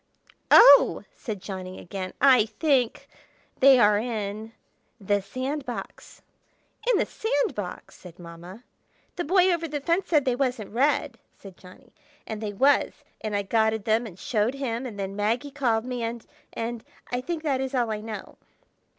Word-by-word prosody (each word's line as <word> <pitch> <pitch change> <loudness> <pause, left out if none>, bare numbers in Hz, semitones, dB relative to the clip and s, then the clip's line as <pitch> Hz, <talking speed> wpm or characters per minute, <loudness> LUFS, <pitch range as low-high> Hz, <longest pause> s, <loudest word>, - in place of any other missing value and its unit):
"Oh!" 280 0 +7
said 210 -6 -7
Johnny 185 -2 -7
again. 185 0 -7
"I 255 -5 +5
think—they 260 +1 +1
are 210 -3 +4
in—the 215 -1 -5
sand 260 +8 -4
box!" 245 -2 -8 0.7
"In 450 - +3
the - - +1
sand 290 -11 -1
box!" 205 -6 -7
said 180 -2 -13
Mamma. 175 +5 -11 0.5
"The 350 - -2
Boy 365 +2 +3
Over 335 -1 -2
the 295 -1 -4
Fence 335 +6 -1
said 300 -5 +3
they 255 -2 +1
wasn't 245 -6 -2
red," 275 0 +1 0.2
said 195 -2 -13
Johnny; 180 0 -17 0.3
"and 220 -1 -6
they 210 -2 -3
was, 270 +8 +2 0.2
and 215 -1 -2
I 200 - 0
gotted 220 +1 +1
them 225 +2 +1
and 185 -4 -12
showed 220 +5 -1
him, 260 -2 -3
and 215 -4 -9
then 195 0 -4
Maggie 230 +7 -1
called 240 -5 0
me, 250 -1 -4
and—and—I 230 +1 -6
think 330 +3 -4
that 275 -4 0
is 265 0 -3
all 240 -3 0
I 210 -1 -3
know." 215 -2 -8
230 Hz, 155 wpm, -25 LUFS, 205-270 Hz, 0.7 s, Oh